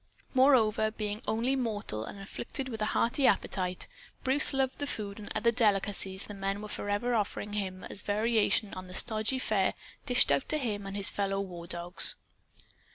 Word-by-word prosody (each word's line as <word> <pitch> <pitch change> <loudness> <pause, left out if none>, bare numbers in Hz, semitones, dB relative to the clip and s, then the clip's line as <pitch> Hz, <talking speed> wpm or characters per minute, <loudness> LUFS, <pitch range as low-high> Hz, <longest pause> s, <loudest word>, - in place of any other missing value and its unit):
Moreover, 250 -5 +5
being 215 0 -4
only 235 +4 +1
mortal 205 - -2
and 200 - -8
afflicted 260 +7 -5
with 220 -3 -6
a - - +2
hearty 250 +3 +3
appetite, 180 -2 0 0.4
Bruce 270 +2 +3
loved 265 -1 0
the 285 - -1
food 205 -5 -4
and 205 - -9
other 235 - +3
delicacies 200 -4 +1
the 210 - -8
men 195 0 -2
were 210 - -6
forever 205 +4 -1
offering 205 -1 -1
him 190 -3 -3
as 195 - -3
a - - -21
variation 215 0 +2
on 185 0 -7
the 180 - -6
stodgy 220 +2 +2
fare 215 -6 +1 0.3
dished 245 -1 +4
out - - +1
to 310 - +2
him 210 -8 -2
and 195 +1 -4
his 200 - +1
fellow 195 -1 -1
war 175 -3 -6
dogs. 175 +1 +1
210 Hz, 180 wpm, -30 LUFS, 195-235 Hz, 0.4 s, Moreover